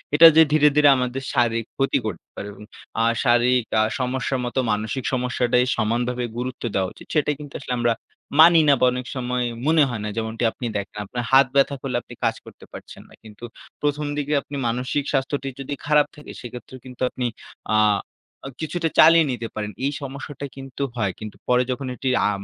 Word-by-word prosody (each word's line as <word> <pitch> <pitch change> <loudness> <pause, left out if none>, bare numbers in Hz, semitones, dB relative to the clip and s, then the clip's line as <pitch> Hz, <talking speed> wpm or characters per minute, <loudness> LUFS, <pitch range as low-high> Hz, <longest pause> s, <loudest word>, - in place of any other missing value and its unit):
এটা 165 +2 +10
যে 160 - +8
ধীরে, 150 -1 +5
ধীরে 150 -1 +6
আমাদের 125 +1 -2
শারীরিক 115 -2 +1
ক্ষতি 135 0 +2
করতে 110 - -5
পারে 100 - -6
এবং 105 - -13 0.4
আ - - +3 0.2
শারীরিক 120 -1 +3 0.2
আ - - +4 0.2
সমস্যার 130 +1 -1
মতো 120 +2 -2
মানসিক 110 +5 -2
সমস্যাটাই 125 -1 +1
সমানভাবে 120 +3 0
গুরুত্ব 125 +1 -5
দেওয়া 95 -1 +1
উচিত - - -14
সেটা 150 -1 +2
কিন্তু 145 -2 -10
আসলে 125 -2 -4
আমরা 120 -1 +2 0.5
মানি 165 0 +8
না 140 - +7
বা 130 - +4
অনেক 125 0 -4
সময় 125 0 -1 0.2
মনে 160 -1 +5
হয় 120 -4 -4
না। 105 - -3
যেমনটি 110 +1 -3
আপনি 125 - -7
দেখেন, 100 +1 -6
আপনার 120 +4 -4
হাত 135 0 +7
ব্যথা 140 0 +3
করলে 130 -3 -3
আপনি - - -13
কাজ - - +2
করতে - - -14
পারছেন - - -11
না। - - -18
কিন্তু 110 +1 -14 0.4
১ম 145 0 0
দিকে 145 +1 -1
আপনি 145 - -9
মানসিক 125 +4 -1
স্বাস্থ্যটি 135 0 -1
যদি 135 +1 -5
খারাপ 150 0 +4
থাকে 150 - -11
সেক্ষেত্রে 125 +1 -9
কিন্তু 125 -1 -12
আপনি 125 - -4 0.5
আ - - +4 0.8
কিছুটা 165 +1 -2
চালিয়ে 165 -1 +8
নিতে 115 -2 -4
পারেন। 105 -1 -3
এই 140 - +1
সমস্যাটা 140 +1 -7
কিন্তু 135 0 -6
হয়। 100 -5 0
কিন্তু 110 -1 -8
পরে 125 0 +3
যখন 130 +1 -4
এটি 130 +2 -2 0.2
আ - - +2
125 Hz, 190 wpm, -23 LUFS, 120-140 Hz, 0.8 s, এটা